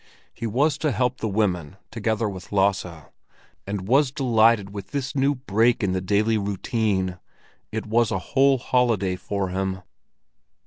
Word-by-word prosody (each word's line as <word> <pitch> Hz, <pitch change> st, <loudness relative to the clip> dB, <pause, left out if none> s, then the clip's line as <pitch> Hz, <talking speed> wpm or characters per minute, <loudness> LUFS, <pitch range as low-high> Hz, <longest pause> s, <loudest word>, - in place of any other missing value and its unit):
He 115 Hz, -, -4 dB
was 140 Hz, +7 st, +1 dB
to 150 Hz, -, +1 dB
help 125 Hz, +1 st, 0 dB
the 110 Hz, -, -2 dB
women 95 Hz, -5 st, -1 dB
together 110 Hz, 0 st, -1 dB
with 95 Hz, -3 st, -8 dB
Lasse, 95 Hz, -5 st, 0 dB, 0.6 s
and 100 Hz, -2 st, -4 dB
was 135 Hz, +4 st, +4 dB
delighted 115 Hz, -6 st, +3 dB
with 100 Hz, -1 st, -7 dB
this 140 Hz, -2 st, -3 dB
break 125 Hz, -5 st, +1 dB
in 95 Hz, -, +1 dB
the 95 Hz, 0 st, -1 dB
daily 105 Hz, +4 st, +1 dB
routine; 100 Hz, -2 st, -1 dB, 0.5 s
it 110 Hz, 0 st, -3 dB
was 115 Hz, +1 st, +2 dB
a -, -, -1 dB, 0.2 s
whole 135 Hz, 0 st, +5 dB
holiday 115 Hz, -7 st, +1 dB
for 100 Hz, 0 st, -3 dB
him. 95 Hz, 0 st, -3 dB
110 Hz, 145 wpm, -24 LUFS, 95-125 Hz, 0.6 s, whole